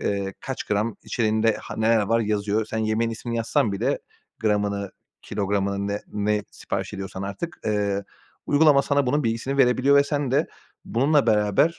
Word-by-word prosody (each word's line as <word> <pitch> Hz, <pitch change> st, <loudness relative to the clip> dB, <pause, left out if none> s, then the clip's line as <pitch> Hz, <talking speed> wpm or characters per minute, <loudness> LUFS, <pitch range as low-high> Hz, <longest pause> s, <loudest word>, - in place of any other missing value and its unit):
eee, 100 Hz, -1 st, -2 dB
kaç 135 Hz, -, -5 dB
gram 105 Hz, +2 st, -1 dB
içeriğinde, 110 Hz, -1 st, +1 dB
han -, -, -6 dB
neler 110 Hz, -1 st, +4 dB
var 115 Hz, +3 st, +2 dB
yazıyor. 105 Hz, 0 st, 0 dB
Sen 110 Hz, -, -3 dB
yemeğin 110 Hz, +1 st, 0 dB
ismini 115 Hz, +1 st, -4 dB
yazsan 115 Hz, -2 st, +1 dB
bile, 100 Hz, -, 0 dB, 0.4 s
gramını, 100 Hz, -2 st, 0 dB, 0.3 s
kilogramını, 100 Hz, 0 st, -1 dB
ne 100 Hz, +1 st, -2 dB
ne 105 Hz, 0 st, 0 dB
sipariş 95 Hz, +1 st, -4 dB
ediyorsan 95 Hz, -1 st, -6 dB
artık, 100 Hz, -, -5 dB
eee, 100 Hz, -2 st, 0 dB, 0.4 s
uygulama 145 Hz, -1 st, +5 dB
sana 140 Hz, -2 st, +1 dB
bunun 145 Hz, +2 st, +1 dB
bilgisini 115 Hz, +5 st, -1 dB
verebiliyor 130 Hz, +2 st, +4 dB
ve 140 Hz, -, +6 dB
sen 145 Hz, -2 st, -1 dB
de 145 Hz, +4 st, +2 dB, 0.4 s
bununla 140 Hz, +4 st, +2 dB
beraber, 105 Hz, +9 st, +3 dB
110 Hz, 160 wpm, -24 LUFS, 100-125 Hz, 0.4 s, ve